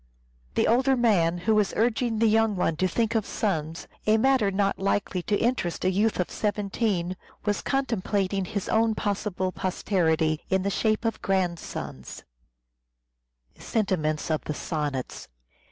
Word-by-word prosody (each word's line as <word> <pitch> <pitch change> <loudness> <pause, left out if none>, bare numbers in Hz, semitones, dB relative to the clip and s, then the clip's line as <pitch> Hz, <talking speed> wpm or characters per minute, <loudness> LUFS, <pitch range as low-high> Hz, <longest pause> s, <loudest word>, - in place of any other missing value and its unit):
The - - +3
older 260 +3 +3
man 180 -8 +3
who 210 +6 +1
was 210 -2 +2
urging 230 0 +1
the 225 - +3
young 220 -1 +3
one 170 -3 0
to 185 - +2
think 225 +5 0
of 225 -2 +1
sons, 165 -7 -2 0.2
a 215 +1 +5
matter 255 -3 +3
not 195 0 0
likely 195 -1 0
to 205 +3 0
interest 225 -8 -1
a 185 - +3
youth 210 +3 +1
of 180 - -1
seventeen, 200 -3 -1 0.3
was 205 -1 0
contemplating 200 -7 0
his 200 0 -4
own 225 0 +2
possible 200 -3 -2
posterity 165 -3 0
in 190 0 +1
the 200 - 0
shape 215 +3 0
of 225 - -1
grandsons. 175 - -3
200 Hz, 130 wpm, -26 LUFS, 185-225 Hz, 0.3 s, a